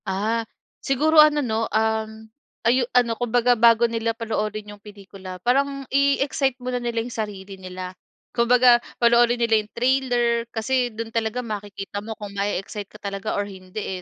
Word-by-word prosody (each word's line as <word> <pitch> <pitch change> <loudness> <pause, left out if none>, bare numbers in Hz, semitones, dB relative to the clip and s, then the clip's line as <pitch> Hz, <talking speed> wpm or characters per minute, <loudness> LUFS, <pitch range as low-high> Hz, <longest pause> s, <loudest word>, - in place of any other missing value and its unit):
Ah, 215 +4 -1 0.4
siguro 305 +4 +4
ano 300 -2 +4
'no, 225 -1 -1
um, 220 0 -1 0.4
ayu 245 +1 +3
ano, 235 -2 +3
kumbaga 245 +1 +3
bago 235 0 +5
nila 230 0 -2
panoorin 215 -2 -3
yung 205 - -16
pelikula 195 -3 -10
parang 275 +2 +1
i-excite 275 -1 +2
muna 250 -1 -3
nila 235 -1 -2
yung 245 - -7
sarili 200 -3 -5
nila. 185 0 -7 0.4
Kumbaga 240 0 +5 0.2
panoorin 240 0 +4
nila 230 -2 +2
yung 210 - -16
trailer 240 -2 +1
kasi 245 +2 0
dun 225 0 -7
talaga 230 +2 -1
makikita 205 -2 -6
mo 220 +1 -7
kung 205 -1 -8
mae-excite 200 0 -3
ka - - -14
talaga 200 +1 -4
or 205 - 0
hindi, 190 -1 -7
230 Hz, 155 wpm, -23 LUFS, 210-245 Hz, 0.4 s, bago